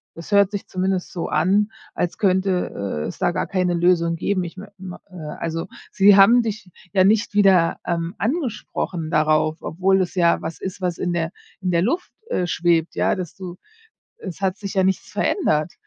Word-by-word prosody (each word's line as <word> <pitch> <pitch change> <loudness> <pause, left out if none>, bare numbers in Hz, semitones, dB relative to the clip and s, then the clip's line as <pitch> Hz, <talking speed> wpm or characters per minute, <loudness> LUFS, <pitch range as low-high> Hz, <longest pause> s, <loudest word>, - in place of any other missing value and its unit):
Das 165 +4 -10
hört 200 -1 +5
sich 205 -1 -5
zumindest 185 0 -2
so 175 - -4
an, 205 +4 +2 0.2
als 175 - -2
könnte, 185 - 0
äh, - - -3
es - - -8
da - - +2
gar - - -2
keine 180 -2 0
Lösung 170 -1 +2
geben. 185 +2 -1
Ich 170 - -9
me 200 +1 -10
mei 185 -2 -8
äh, - - -19 0.2
also, 165 0 -3 0.2
sie 200 0 +6
haben 230 +5 +7
dich 215 -5 -5 0.2
ja 190 - +5
nicht 205 +1 +2
wieder, 190 -5 +4
ähm, 170 +1 -2
angesprochen 215 - -3
darauf, 155 0 +2
obwohl 190 +3 +1
es 180 - -3
ja 170 -2 +3
was 160 0 -6
ist, 190 0 -6
was 180 -2 -1
in 175 -1 -2
der 165 0 -1 0.3
in 185 - -1
der 170 0 +2
Luft, 340 - -1 0.2
äh, 180 - 0
schwebt, 170 -1 +1
ja, - - +2
dass 180 -4 -6
du 180 -2 -8 0.6
es 185 -2 -8
hat 190 0 0
sich 200 -2 -6
ja 190 - +3
nichts 190 0 0
verändert. 155 - 0
185 Hz, 195 wpm, -22 LUFS, 170-195 Hz, 0.6 s, haben